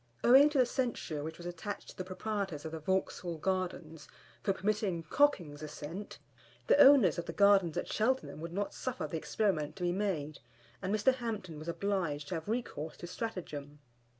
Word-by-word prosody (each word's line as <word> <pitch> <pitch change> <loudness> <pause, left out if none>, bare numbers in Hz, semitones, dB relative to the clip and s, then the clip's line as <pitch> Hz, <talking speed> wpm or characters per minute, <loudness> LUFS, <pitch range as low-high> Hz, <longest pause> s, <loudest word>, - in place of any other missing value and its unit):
Owing 270 +5 +8
to 295 - -1
the 255 - +6
censure 235 - -2
which 160 +1 -6
was 175 - -10
attached 175 +4 -5
to - - -11
the 185 - -4
proprietors 185 -4 -3
of 160 - -4
the 160 - -5
Vauxhall 180 0 -1
Gardens, 175 -3 -3 0.3
for 195 - +1
permitting 195 -3 -1
docking's 175 - +3
ascent, 155 +6 -7 0.5
the - - +5
owners 255 - +7
of 170 - -4
the - - -2
Gardens 200 -5 +4
at - - -2
Cheltenham 235 - 0
would 165 0 -5
not 200 +3 -2
suffer 255 -1 -3
the 165 - -3
experiment 160 -4 0
to 185 - -6
be 175 - +2
made, 175 -7 -2 0.4
and 190 0 -2
Mr. 215 +5 +4
Hampton 215 -10 -5
was 155 - -9
obliged 170 -5 -1
to - - -3
have 165 0 -4
recourse 210 -9 -3
to - - -8
stratagem. 165 -8 -5
185 Hz, 180 wpm, -32 LUFS, 160-210 Hz, 0.5 s, Owing